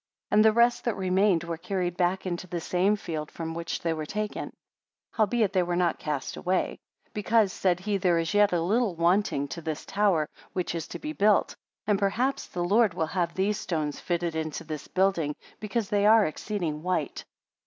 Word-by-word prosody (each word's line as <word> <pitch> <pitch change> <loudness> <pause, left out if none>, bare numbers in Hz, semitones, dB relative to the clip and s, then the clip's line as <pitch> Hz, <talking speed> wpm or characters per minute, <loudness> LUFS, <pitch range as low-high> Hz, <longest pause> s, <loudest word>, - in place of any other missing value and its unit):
79 - - +3
And 215 - +6
the 220 +1 +4
rest 235 +1 +4
that 235 - 0
remained 185 -2 +2
were 170 -1 -4
carried 180 0 -2
back 180 +1 0
into 180 0 -3
the 175 -1 -3
same 185 +5 +1
field 155 -6 -5
from 165 -1 -5
which 170 +1 -4
they 165 -1 +1
were 155 -1 -5
taken; 210 +3 -3 0.6
howbeit, 215 -2 +1
they 185 - +3
were 175 0 -1
not 175 -2 +1
cast 150 -3 -3
away; 185 +1 -1 0.3
because, 210 -1 +2
said 180 -2 +1
he, 205 +1 0
there 180 -3 +2
is 165 +3 -1
yet 205 0 +5
a 170 -2 +1
little 210 +1 +1
wanting 170 -3 +2
to 170 - -6
this 155 -2 -4
tower, 195 -7 +2 0.3
which 180 -2 -2
is 165 -1 -4
to - - -6
be 305 0 -5
built; 210 -5 +3 0.3
and 205 -2 +2
perhaps 240 +7 0
the 175 - -3
Lord 205 +1 +3
will 160 - 0
have 170 0 -2
these 200 +2 0
stones 155 -4 -2
fitted 170 -2 -2
into 155 -1 -3
this 155 -2 -6
building, 185 -6 +1 0.2
because 210 0 -2
they 205 -1 +3
are 220 -1 +6
exceeding 160 -2 -3
white. 175 -4 -2
180 Hz, 195 wpm, -27 LUFS, 165-205 Hz, 0.6 s, And